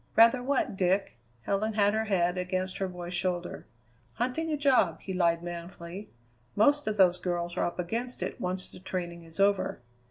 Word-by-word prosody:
"Rather 230 +3 +6
what, 260 -5 0
Dick?" 190 -6 0 0.2
Helen 210 - 0
had 205 -1 +3
her 220 0 0
head 180 -4 +1
against 185 +1 -2
her 195 - 0
boy's 180 -1 -7
shoulder. 180 0 -2 0.5
"Hunting 255 +8 -1
a 300 - 0
job," 255 - +3
he 190 - -5
lied 170 -2 +2
manfully. 175 +3 -7 0.5
"Most 285 +7 +3
of 215 0 -1
those 180 -2 +5
girls 175 -1 -2
are - - +1
up 175 - -6
against 230 +8 -3
it - - -5
once 185 0 -2
the - - -11
training 175 -2 -5
is 165 +3 -10
over." 200 0 +2
185 Hz, 180 wpm, -29 LUFS, 175-215 Hz, 0.5 s, Rather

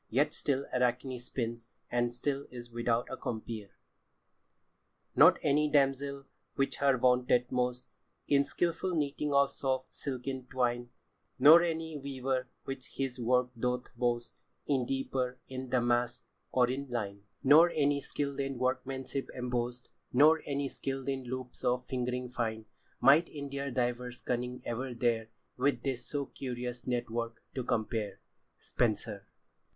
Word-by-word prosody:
Yet 135 +6 +2
still 140 -1 0
Arachne 125 +1 +1
spins, 115 -1 -4 0.2
and 120 0 +1
still 135 +3 -2
is 120 -1 -9
without 120 0 0
a - - -2
compeer. 110 -4 -5 1.5
"Not - - +8
anie 150 +1 +3
damzell, 140 -1 +2 0.3
which 135 0 0
her 140 -2 +3
vaunteth 125 0 +3
most 125 0 -1 0.4
In 140 -1 +5
skilfull 170 +4 -1
knitting 145 0 -1
of 140 0 +4
soft 130 -1 -2
silken 130 -1 -4
twyne, 120 -2 0 0.5
Nor 150 +6 +10
anie 160 -2 -2
weaver, 130 -2 -2
which 135 +1 -7
his 135 -2 -2
worke 125 +1 +2
doth 125 +1 -2
boast 120 -1 -1 0.2
In 130 -4 +1
dieper, 130 -1 -1
in 130 -1 -6
damaske, 120 -1 +1 0.3
or 125 -1 +4
in 140 +2 -3
lyne, 100 -5 -3 0.2
Nor 155 +5 +8
anie 145 -3 +2
skil'd 140 -1 -3
in 135 -1 -2
workmanship 130 +1 -2
embost, 125 -1 -2 0.2
Nor 155 +5 +6
anie 140 -1 -1
skil'd 135 0 -4
in 135 -1 -2
loupes 130 0 -5
of 125 0 +1
fingring 125 -1 -2
fine, 110 -2 -2 0.3
Might 145 +7 +6
in 140 -2 -6
their 140 0 -2
divers 125 -1 -2
cunning 125 +1 -2
ever 125 +2 -3
dare 115 -2 +1 0.3
With 140 +3 +1
this 130 -3 -2
so 140 -1 -2
curious 125 -2 -5
networke 120 -2 -2 0.2
to 130 - -2
compare." 110 -4 -1 0.4
Spenser. - - -1
125 Hz, 135 wpm, -32 LUFS, 120-140 Hz, 1.5 s, Nor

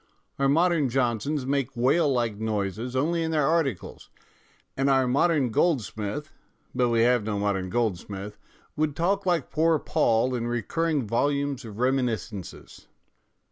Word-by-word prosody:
Our 135 0 +3
modern 165 -2 +3
Johnsons 130 +3 -1
make 135 -2 -1
whale 140 +5 +3
like 120 -5 0
noises 110 +3 -3
only 165 +6 +1
in 165 - -1
their 155 -3 +1
articles, 145 - -1 0.7
and 135 +1 +1
our 135 -1 +3
modern 140 0 +2
Goldsmith 135 - -1 0.4
but 125 -1 +1
we 115 -1 +2
have 120 -1 +3
no 105 -1 -2
modern 100 -2 -1
Gold 110 -4 0
smith 100 +1 -8 0.4
would 150 -1 -1
talk 190 +4 0
like 170 -6 0
poor 160 +1 +3
Poll 120 -2 +1
in 120 -1 -2
recurring 140 +5 -1
volumes 140 +4 0
of 105 -2 -9
reminiscences. 120 -6 -3
130 Hz, 140 wpm, -26 LUFS, 110-150 Hz, 0.7 s, Our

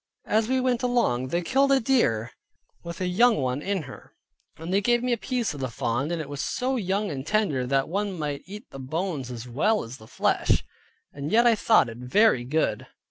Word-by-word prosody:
As 220 +1 +1
we 260 +1 +1
went 250 -2 +1
along 235 - +1
they 170 +6 -1
killed 275 +8 +2
a 270 - +5
deer, 170 - +1 0.5
with 170 +1 -7
a - - 0
young 235 +7 +4
one 130 0 -1
in 195 -1 -2
her, 135 -2 -13 0.4
they 180 +5 -1
gave 240 +3 +2
me 250 -1 +1
a - - +3
piece 235 - -2
of 145 - -8
the 130 -1 -2
fawn, 120 +5 -2
and 170 -1 -2
it 155 - -5
was 145 0 -5
so 260 +1 -1
young 200 -2 -1
and 135 -2 -4
tender, 155 -8 0
that 135 +1 +1
one 195 +2 -2
might 145 -3 -3
eat 210 +4 -10
the 135 - -9
bones 150 0 -3
as 120 0 -7
well 210 - +1
as 115 +3 -9
the 110 - -15
flesh, - - +1 0.5
and 140 +2 -5
yet 235 +2 +5
I 235 - +6
thought 220 - +4
it 115 0 -9
very 130 - +3
good. 155 +5 -1
175 Hz, 215 wpm, -26 LUFS, 135-225 Hz, 0.5 s, I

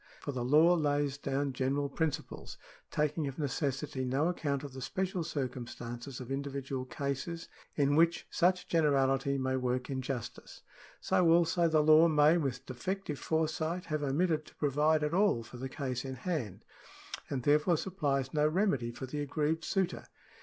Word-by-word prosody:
For 145 - -4
the 125 -3 -3
law 155 +7 +5
lays 145 -3 0
down 140 0 -1
general 135 +2 0
principles, 155 +1 -3 0.3
taking 150 0 0
of 135 - -6
necessity 140 -1 -2
no 135 +6 +1
account 145 -5 -2
of 140 -2 -7
the 130 - -7
special 185 +5 -2
circumstances 125 -3 -5
of 130 0 -8
individual 135 -1 -3
cases 140 +5 -4 0.3
in 145 -1 +2
which 165 +1 +3
such 180 +1 +2
generality 140 -3 +2
may 130 0 0
work 125 +1 -1
injustice. 130 -3 -5 0.4
So 175 -2 +3
also, 170 +1 +4
the 155 -2 +3
law 155 +2 +7
may 150 0 +5
with 135 -5 -3
defective 150 +4 -4
foresight 160 +2 -1
have 155 -2 -2
omitted 155 +2 0
to - - -16
provide 150 +2 +2
at 150 +2 -1
all 190 - +3
for 120 +2 -11
the 130 +2 -5
case 130 -4 -3
in 130 -1 -5
hand, 125 - -4 0.6
and 130 -3 -2
therefore 150 +4 +3
supplies 145 -8 -1
no 150 0 +3
remedy 155 - +1
for 120 +3 -6
the 145 +3 -4
aggrieved 155 +3 -1
suitor. 190 0 -1
145 Hz, 160 wpm, -32 LUFS, 130-160 Hz, 0.6 s, law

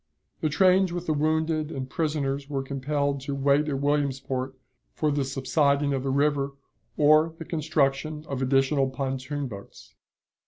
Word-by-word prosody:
The 155 - 0
trains 185 +3 +4
with 175 0 -4
the 155 - +1
wounded 155 +1 0
and 130 -2 -4
prisoners 145 -3 -2
were 135 -2 -2
compelled 140 +1 -1
to 140 +1 -4
wait 140 +2 +2
at 135 -2 -1
Williamsport 135 -2 -1 0.4
for 155 -1 +1
the 140 -1 0
subsiding 140 +2 +1
of 135 - -1
the 135 - -2
river 140 0 +1 0.4
or 155 +2 +4
the 165 - -7
construction 150 -1 -1
of 135 -2 -3
additional 135 +1 +2
pontoon 135 +1 -3
boats. 100 -4 -11
140 Hz, 150 wpm, -26 LUFS, 135-155 Hz, 0.4 s, trains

